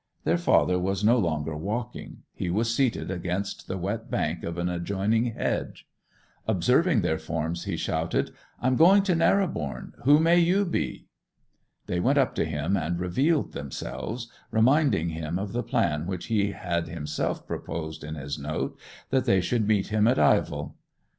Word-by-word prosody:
Their -, -, +2 dB
father 90 Hz, 0 st, +3 dB
was 95 Hz, +2 st, -1 dB
no 120 Hz, +4 st, +5 dB
longer 80 Hz, -5 st, -1 dB
walking; 110 Hz, +9 st, -5 dB
he 90 Hz, -, -3 dB
was 115 Hz, +6 st, +1 dB
seated 125 Hz, -6 st, 0 dB
against 90 Hz, +2 st, -3 dB
the 95 Hz, -, -3 dB
wet 105 Hz, +7 st, -3 dB
bank 80 Hz, +3 st, -1 dB
of 85 Hz, +1 st, -4 dB
an 85 Hz, 0 st, -1 dB
adjoining 100 Hz, +6 st, 0 dB
hedge. 115 Hz, -, -3 dB, 0.6 s
Observing 120 Hz, -, +3 dB
their 80 Hz, -3 st, 0 dB
forms 80 Hz, +2 st, -3 dB
he -, -, -2 dB
shouted, 80 Hz, +1 st, -1 dB, 0.3 s
'I'm 130 Hz, 0 st, +2 dB
going 190 Hz, +5 st, +7 dB
to 190 Hz, -2 st, +2 dB
Narrobourne; 165 Hz, -, 0 dB
who 145 Hz, +4 st, +6 dB
may 170 Hz, +2 st, +5 dB
you 185 Hz, +4 st, +3 dB
be?' 170 Hz, -, -2 dB, 0.8 s
They 90 Hz, -, -1 dB
went 135 Hz, +9 st, +2 dB
up 135 Hz, -2 st, +3 dB
to -, -, 0 dB
him, 80 Hz, +4 st, -1 dB
and 85 Hz, -1 st, -1 dB
revealed 135 Hz, -, +1 dB
themselves, 110 Hz, -, -5 dB, 0.2 s
reminding 125 Hz, -, +3 dB
him 80 Hz, +1 st, -3 dB
of 100 Hz, +2 st, -4 dB
the 120 Hz, -, 0 dB
plan 85 Hz, -11 st, 0 dB
which 95 Hz, -2 st, -4 dB
he 100 Hz, -1 st, +2 dB
had 85 Hz, -3 st, -2 dB
himself 75 Hz, -3 st, -3 dB
proposed 80 Hz, -2 st, -5 dB
in 75 Hz, +2 st, -5 dB
his 70 Hz, 0 st, -5 dB
note, 75 Hz, +2 st, -3 dB, 0.3 s
that 130 Hz, -1 st, +2 dB
they 95 Hz, -, +4 dB
should 110 Hz, +3 st, 0 dB
meet 105 Hz, -3 st, +2 dB
him 105 Hz, +1 st, +3 dB
at 125 Hz, +2 st, +3 dB
Ivell. -, -, +2 dB
95 Hz, 165 wpm, -26 LUFS, 85-120 Hz, 0.8 s, going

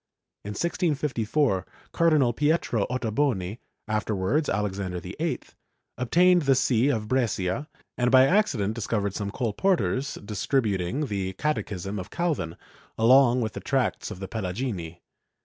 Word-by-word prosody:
In 105 Hz, -, -5 dB
1654, 145 Hz, -, 0 dB, 0.3 s
Cardinal 155 Hz, -7 st, +3 dB
Pietro 145 Hz, -6 st, +1 dB
Ottoboni 115 Hz, -4 st, -1 dB, 0.3 s
(afterwards 110 Hz, +6 st, 0 dB
Alexander 95 Hz, -2 st, -2 dB
VIII) -, -, -3 dB, 0.6 s
obtained 175 Hz, +8 st, +4 dB
the 135 Hz, -3 st, +3 dB
see 130 Hz, 0 st, +2 dB
of 110 Hz, -6 st, -1 dB
Brescia 120 Hz, -, -1 dB, 0.3 s
and 125 Hz, 0 st, +3 dB
by 130 Hz, +1 st, +7 dB
accident 135 Hz, -, +2 dB
discovered 105 Hz, -3 st, -2 dB
some 100 Hz, -1 st, -3 dB
col 115 Hz, +1 st, -2 dB
porteurs 135 Hz, -, 0 dB
distributing 105 Hz, +2 st, 0 dB
the 95 Hz, -5 st, -3 dB
Catechism 100 Hz, -, -2 dB
of 95 Hz, -, -7 dB
Calvin, 150 Hz, -, -2 dB, 0.4 s
along 125 Hz, +2 st, +5 dB
with 110 Hz, -1 st, -2 dB
the -, -, -5 dB
tracts 135 Hz, -4 st, -1 dB
of -, -, -8 dB
the 95 Hz, -, -5 dB
Pelagini. 95 Hz, -5 st, -4 dB
115 Hz, 125 wpm, -26 LUFS, 100-140 Hz, 0.6 s, by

